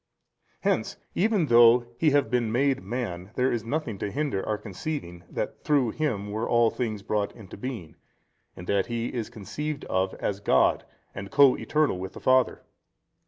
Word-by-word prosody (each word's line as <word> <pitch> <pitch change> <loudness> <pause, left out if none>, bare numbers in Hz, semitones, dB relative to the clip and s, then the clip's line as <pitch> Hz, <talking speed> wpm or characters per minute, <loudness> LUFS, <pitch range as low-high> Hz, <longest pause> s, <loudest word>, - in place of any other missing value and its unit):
Hence - - 0 0.2
even 205 -4 +2
though 120 -1 +6
He 160 - +4
have 145 -5 +2
been 120 -3 +1
made 135 +2 +2
man, 100 -7 -4
there 130 +1 +2
is 115 -3 -1
nothing 115 -4 -3
to 105 - -2
hinder 135 -5 -2
our 105 - 0
conceiving 95 - -6
that - - -4
through 140 -6 +2
Him 105 -10 -2
were 110 +2 -2
all 120 -1 +4
things 110 -5 -3
brought 105 -2 -1
into 105 -5 -11
being, 110 -8 -6 0.6
in 90 - -9
that 100 0 +1
He 120 0 -2
is 115 -3 -3
conceived 130 +7 -5
of 95 +1 -1
as 100 -1 -3
God 100 - +3 0.3
and 100 0 -7
co 140 0 +6
eternal 150 -11 0
with 95 +1 -6
the - - -9
Father. 130 0 +2
115 Hz, 170 wpm, -26 LUFS, 100-135 Hz, 0.6 s, though